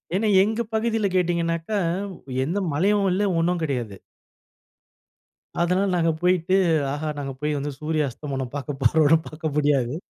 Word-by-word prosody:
ஏன்னா 215 Hz, +3 st, +1 dB, 0.2 s
எங்க 220 Hz, +3 st, -1 dB
பகுதியில 220 Hz, -1 st, +1 dB
கேட்டீங்கனாக்க, 170 Hz, -1 st, 0 dB, 0.8 s
எந்த 185 Hz, +7 st, -1 dB
மலையும் 195 Hz, +5 st, +2 dB
இல்ல 190 Hz, +3 st, +1 dB, 0.2 s
ஒண்ணும் 175 Hz, +1 st, 0 dB
கெடையாது. 120 Hz, -9 st, -3 dB, 1.6 s
அதனால 180 Hz, +3 st, +2 dB
நாங்க 165 Hz, -1 st, +2 dB
போயிட்டு, 180 Hz, 0 st, +2 dB, 0.4 s
ஆஹா 155 Hz, +1 st, -3 dB
நாங்க 135 Hz, -1 st, -4 dB
போய் 150 Hz, 0 st, -1 dB
வந்து 145 Hz, +1 st, -3 dB
சூரிய 155 Hz, -1 st, 0 dB
அஸ்தமனம் 135 Hz, -1 st, -5 dB
பார்க்க 145 Hz, -1 st, -5 dB
போறோன்னு 155 Hz, +5 st, +5 dB
பார்க்க 155 Hz, -1 st, -5 dB
முடியாது. 140 Hz, -3 st, +1 dB
160 Hz, 130 wpm, -24 LUFS, 145-180 Hz, 1.6 s, போறோன்னு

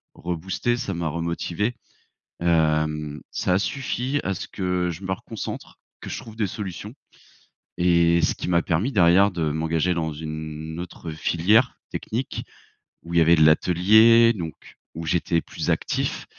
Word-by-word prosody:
reboosté, 90 Hz, +7 st, -2 dB
ça 100 Hz, -5 st, -3 dB
m'a 85 Hz, -1 st, -2 dB
remotivé. 85 Hz, +7 st, -2 dB, 0.7 s
Hem, 75 Hz, -3 st, +1 dB
ça 90 Hz, -, 0 dB
a -, -, +4 dB
suffi 135 Hz, +3 st, -2 dB
à 95 Hz, -, -1 dB
ce -, -, -7 dB
que 90 Hz, -2 st, -1 dB
je 85 Hz, +3 st, -8 dB
me 95 Hz, -, -2 dB
reconcentre, 105 Hz, +3 st, -7 dB, 0.2 s
que -, -, -8 dB
je -, -, -4 dB
trouve 110 Hz, -1 st, -11 dB
des 110 Hz, -2 st, 0 dB
solutions. 100 Hz, +1 st, -6 dB, 0.9 s
Et 85 Hz, -1 st, +4 dB
ce -, -, +2 dB
qui -, -, -5 dB
m'a 85 Hz, -1 st, +3 dB
permis 90 Hz, +10 st, 0 dB
derrière 95 Hz, 0 st, +5 dB
de 85 Hz, -4 st, -1 dB
m'engager 80 Hz, +3 st, 0 dB
dans 80 Hz, -2 st, -2 dB
une 80 Hz, +1 st, -6 dB
autre 85 Hz, -1 st, -7 dB
filière 100 Hz, +10 st, +2 dB
technique, 125 Hz, +4 st, -4 dB, 0.6 s
où 85 Hz, +1 st, -8 dB
il -, -, +2 dB
y -, -, +6 dB
avait 85 Hz, +1 st, +6 dB
de 80 Hz, -, +4 dB
l'atelier, 110 Hz, +9 st, +6 dB
donc 80 Hz, -, -8 dB, 0.2 s
où 80 Hz, +1 st, -5 dB
j'étais 85 Hz, +1 st, +1 dB
plus -, -, -5 dB
actif -, -, -2 dB
85 Hz, 155 wpm, -24 LUFS, 80-100 Hz, 0.9 s, y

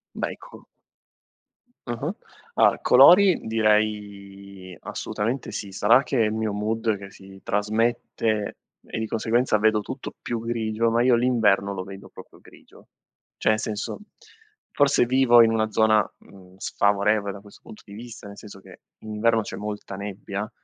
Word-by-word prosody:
Bei -, -, -3 dB
co -, -, -15 dB, 1.2 s
Ah-ah. 135 Hz, -, -4 dB, 0.4 s
Allora, -, -, +3 dB
colori 185 Hz, 0 st, +6 dB
direi, 100 Hz, -4 st, -2 dB
assolutamente 115 Hz, +5 st, -4 dB
sì. 100 Hz, -, -6 dB
Sarà 115 Hz, +7 st, +4 dB
che 135 Hz, -, -2 dB
è -, -, +3 dB
il 105 Hz, -, -1 dB
mio 110 Hz, -1 st, -2 dB
mood 110 Hz, +1 st, -1 dB
che 100 Hz, 0 st, -11 dB
si 95 Hz, 0 st, -15 dB
trasmette 110 Hz, 0 st, -1 dB, 0.3 s
e, -, -, -6 dB
di 110 Hz, -, -3 dB
conseguenza, 115 Hz, +1 st, +1 dB
vedo 110 Hz, 0 st, +2 dB
tutto 130 Hz, +6 st, -7 dB
più 120 Hz, -, -3 dB
grigio, 115 Hz, -1 st, -1 dB
ma 115 Hz, +1 st, +2 dB
io 125 Hz, 0 st, +4 dB
l'inverno 110 Hz, -5 st, +2 dB
lo 95 Hz, -, -5 dB
vedo 95 Hz, +1 st, -11 dB
proprio -, -, -15 dB
grigio. -, -, -19 dB, 0.5 s
Cioè, 110 Hz, -, +2 dB
senso, 110 Hz, -1 st, -4 dB, 0.7 s
forse 145 Hz, -3 st, +3 dB
vivo 120 Hz, -1 st, +5 dB
in 115 Hz, -1 st, +4 dB
una 110 Hz, -1 st, 0 dB
zona, 110 Hz, -1 st, +3 dB
mhmm, 95 Hz, -1 st, -18 dB
sfavorevole 100 Hz, +1 st, +1 dB
da 100 Hz, -, -10 dB
questo 100 Hz, 0 st, -17 dB
punto 105 Hz, -, -13 dB
di 100 Hz, -, -13 dB
vista, 115 Hz, -1 st, -10 dB
nel 100 Hz, 0 st, -11 dB
senso 100 Hz, -2 st, -12 dB
che -, -, -16 dB, 0.2 s
in 110 Hz, -1 st, -8 dB
inverno 115 Hz, +1 st, +2 dB
c'è -, -, -7 dB
molta 105 Hz, -1 st, -6 dB
nebbia, 100 Hz, +1 st, -6 dB
110 Hz, 155 wpm, -24 LUFS, 100-115 Hz, 1.2 s, colori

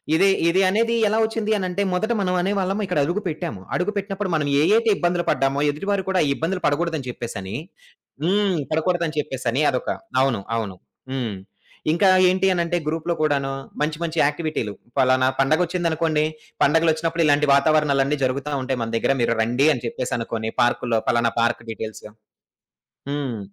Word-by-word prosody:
ఇది 190 Hz, +4 st, +4 dB, 0.2 s
ఇది 190 Hz, +3 st, +3 dB
అనేది 230 Hz, +4 st, +1 dB
ఎలా 215 Hz, +2 st, +1 dB
ఒచ్చింది 220 Hz, -1 st, -2 dB
అనంటే, 185 Hz, 0 st, -2 dB
మొదట 220 Hz, +6 st, 0 dB
మనం 185 Hz, -2 st, 0 dB
అనే 190 Hz, -, 0 dB
వాళ్ళం 195 Hz, +2 st, -1 dB
ఇక్కడడుగు 175 Hz, +2 st, 0 dB
పెట్టాము. 130 Hz, -, -4 dB
అడుగు 180 Hz, +4 st, 0 dB
పెట్టినపుడు 200 Hz, -1 st, -3 dB
మనం 150 Hz, -2 st, 0 dB
ఏయైతే 225 Hz, +7 st, +3 dB
ఇబ్బందులు 175 Hz, 0 st, 0 dB
పడ్డామో, 135 Hz, +1 st, +1 dB
ఎదుటివారు 195 Hz, +6 st, -1 dB
కూడా 190 Hz, -1 st, +2 dB
ఆ -, -, +1 dB
ఇబ్బందులు 175 Hz, +6 st, -2 dB
పడకూడదని 155 Hz, -2 st, 0 dB
చెప్పేసని 110 Hz, -5 st, -6 dB, 0.7 s
హ్మ్. 195 Hz, 0 st, +2 dB
పడకూడదని 165 Hz, 0 st, 0 dB
చెప్పేసని 130 Hz, -2 st, -2 dB
అదొక 130 Hz, -2 st, -2 dB, 0.3 s
అవును. 130 Hz, -5 st, +1 dB, 0.2 s
అవును. 105 Hz, -5 st, -3 dB, 0.4 s
హ్మ్. 120 Hz, -6 st, -3 dB, 0.6 s
ఇంకా 195 Hz, +4 st, +3 dB, 0.2 s
ఏంటి 185 Hz, +1 st, +1 dB
అనంటే, 175 Hz, 0 st, 0 dB
గ్రూప్‌లో 160 Hz, +2 st, -1 dB
కూడాను 140 Hz, -3 st, +1 dB, 0.3 s
మంచి 150 Hz, 0 st, 0 dB
మంచి 165 Hz, 0 st, -4 dB
యాక్టివిటీలు. 150 Hz, -8 st, -2 dB, 0.3 s
పలానా 130 Hz, 0 st, +4 dB
పండగొచ్చిందనుకోండి, 160 Hz, +1 st, +1 dB, 0.4 s
పండగలొచ్చినపుడు 165 Hz, +2 st, +2 dB
ఇలాంటి 145 Hz, 0 st, +3 dB
వాతావరణాలన్ని 145 Hz, -1 st, +2 dB
జరుగుతా 140 Hz, +3 st, -1 dB
ఉంటాయి 130 Hz, -1 st, -2 dB
మన 115 Hz, -, -4 dB
దగ్గర, 135 Hz, -, +2 dB
మీరు 115 Hz, -, +1 dB
రండి 125 Hz, +6 st, +2 dB
అని 125 Hz, -, -6 dB
చెప్పేసనుకోని, 115 Hz, -2 st, -3 dB
పార్కుల్లో 120 Hz, -1 st, +1 dB
పలానా 120 Hz, -1 st, +2 dB
పార్క్ 115 Hz, 0 st, 0 dB
డీటెయిల్స్. 110 Hz, 0 st, -7 dB, 1.1 s
హ్మ్. 135 Hz, -6 st, -3 dB
155 Hz, 145 wpm, -22 LUFS, 130-180 Hz, 1.1 s, ఇది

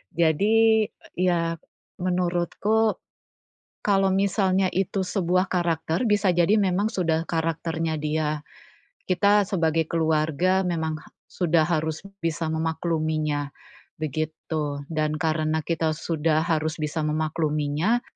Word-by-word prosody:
Jadi, 215 Hz, +7 st, +4 dB, 0.3 s
ya, 170 Hz, -2 st, +1 dB, 0.4 s
menurutku, 180 Hz, +5 st, +1 dB, 0.9 s
kalau 195 Hz, -2 st, +2 dB
misalnya 195 Hz, -1 st, +2 dB
itu 195 Hz, +1 st, -1 dB
sebuah 185 Hz, 0 st, 0 dB
karakter, 170 Hz, +3 st, 0 dB
bisa 205 Hz, -3 st, +2 dB
jadi 175 Hz, +3 st, +3 dB
memang 195 Hz, +2 st, +1 dB
sudah 165 Hz, -3 st, 0 dB
karakternya 165 Hz, -1 st, -2 dB
dia. 150 Hz, 0 st, -1 dB, 0.8 s
Kita 200 Hz, +3 st, +3 dB
sebagai 165 Hz, -4 st, +1 dB
keluarga 160 Hz, +3 st, +1 dB
memang 160 Hz, -2 st, -1 dB
ha -, -, -15 dB, 0.2 s
sudah 165 Hz, -3 st, +2 dB
harus 160 Hz, -1 st, -1 dB, 0.2 s
bisa 165 Hz, 0 st, -1 dB
memakluminya, 155 Hz, -2 st, -1 dB, 0.5 s
begitu. 155 Hz, -1 st, -3 dB
Dan 155 Hz, -1 st, 0 dB
karena 155 Hz, 0 st, 0 dB
kita 160 Hz, -1 st, 0 dB
sudah 160 Hz, -1 st, 0 dB
harus 155 Hz, -2 st, 0 dB
bisa 155 Hz, +2 st, -2 dB
memakluminya, 155 Hz, +6 st, 0 dB
165 Hz, 100 wpm, -25 LUFS, 155-185 Hz, 0.9 s, Jadi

